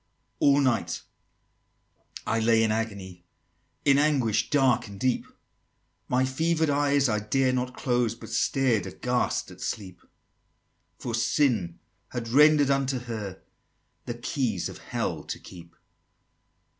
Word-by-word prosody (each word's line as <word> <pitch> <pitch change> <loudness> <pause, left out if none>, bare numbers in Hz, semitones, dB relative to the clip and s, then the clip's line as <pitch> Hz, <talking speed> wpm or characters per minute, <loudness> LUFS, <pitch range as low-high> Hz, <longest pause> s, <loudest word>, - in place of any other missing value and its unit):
XXV. - - -47
"All 140 0 +5
night 120 -11 0 1.2
I 115 - 0
lay 115 0 +4
in 110 - +2
agony, 100 -5 -4 0.6
In 140 -1 +5
anguish 135 -8 +2
dark 130 -4 +2
and 100 -1 -10
deep; 130 -1 0 0.8
My 130 +1 +2
fever'd 160 +3 +1
eyes 140 -1 +2
I 105 -3 +1
dared 130 +5 +1
not 125 0 -2
close, 120 -4 0
But - - -11
stared 125 -8 +1
aghast 125 0 -1
at - - -13
Sleep: 95 -4 -5 1.0
For 120 - -5
Sin 115 - +1 0.3
had 120 -2 -5
render'd 145 +2 +5
unto 135 -1 +1
her 110 -6 -6 0.6
The 120 - -3
keys 120 - -2
of - - -10
Hell - - -3
to - - -5
keep!" 85 -2 -13
125 Hz, 130 wpm, -27 LUFS, 110-135 Hz, 1.2 s, All